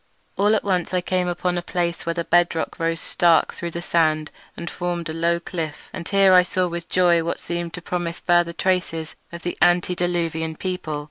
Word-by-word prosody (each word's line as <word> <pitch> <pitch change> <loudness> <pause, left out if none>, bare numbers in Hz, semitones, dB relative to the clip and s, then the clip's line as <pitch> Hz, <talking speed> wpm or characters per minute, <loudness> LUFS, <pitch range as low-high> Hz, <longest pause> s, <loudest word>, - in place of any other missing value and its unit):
All 205 +2 +3
at - - 0
once 185 -2 0
I 180 - +2
came 180 0 0
upon 175 0 -1
a - - -5
place 170 -1 -2
where 170 - 0
the 170 - -1
bed 175 0 +3
rock 160 - -3
rose 165 0 0
stark 170 -2 +3
through 170 - -5
the 170 +1 -6
sand 155 -3 +1 0.3
and 170 - -6
formed 175 -2 -3
a - - -3
low 170 +1 +1
cliff; 165 -3 -6
and 170 - -6
here 195 -1 +5
I 180 - +8
saw 180 0 0
with 170 0 -6
joy 175 -2 +3
what 170 - -2
seemed 170 -1 -4
to 180 - -8
promise 175 -1 -3
further 175 -1 +3
traces 170 -3 -1 0.2
of 170 0 -8
the 175 - -3
antediluvian 175 -2 +1
people. 180 -4 -3
175 Hz, 205 wpm, -23 LUFS, 165-180 Hz, 0.3 s, I